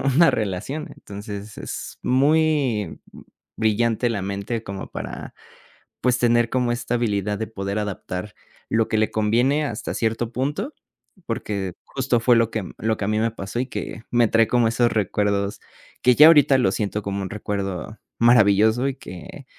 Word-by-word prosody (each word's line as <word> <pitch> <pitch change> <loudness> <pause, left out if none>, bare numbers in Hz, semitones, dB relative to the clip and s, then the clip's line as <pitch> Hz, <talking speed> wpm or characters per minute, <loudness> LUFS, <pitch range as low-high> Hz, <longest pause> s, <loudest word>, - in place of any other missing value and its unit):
una 165 +2 +7
relación. 110 +9 -3
Entonces 100 +1 -8
es - - -6
muy, 140 - +2
mm, - - -13 0.3
brillante 115 +2 +1
la 105 -4 -2
mente 100 +4 -3
como 100 -2 -6
para, - - -7 0.7
pues, 125 -1 +2
tener 120 -1 +3
como 125 -1 +1
esta 120 0 -3
habilidad 105 -4 0
de 110 - -3
poder 100 -1 -3
adaptar 105 -1 -5 0.4
lo 115 -1 +2
que 110 - 0
le 110 0 +1
conviene, 120 +8 +2
hasta 110 -6 -4
cierto 115 0 -1
punto, 150 - -2 0.5
porque 100 -5 -3
justo, 130 -3 0
fue 120 +1 +5
lo 115 -1 +3
que 110 - -2
lo 110 0 0
que - - -4
a - - -2
mí 110 0 +1
me 115 +1 +2
pasó 110 +1 -5
y 130 - 0
que 115 - -6
me 120 -2 +4
trae 115 -1 +4
como 120 0 +3
esos 120 +1 +2
recuerdos 100 -1 0 0.4
que 125 0 +5
ya 150 +4 +9
ahorita 145 -4 +6
lo 110 -7 +2
siento 105 +1 -2
como 100 0 -3
un 95 - -4
recuerdo 100 0 -4 0.2
maravilloso 110 +1 +4
y 135 - -2
que, 90 - -10
110 Hz, 170 wpm, -23 LUFS, 100-125 Hz, 0.7 s, ya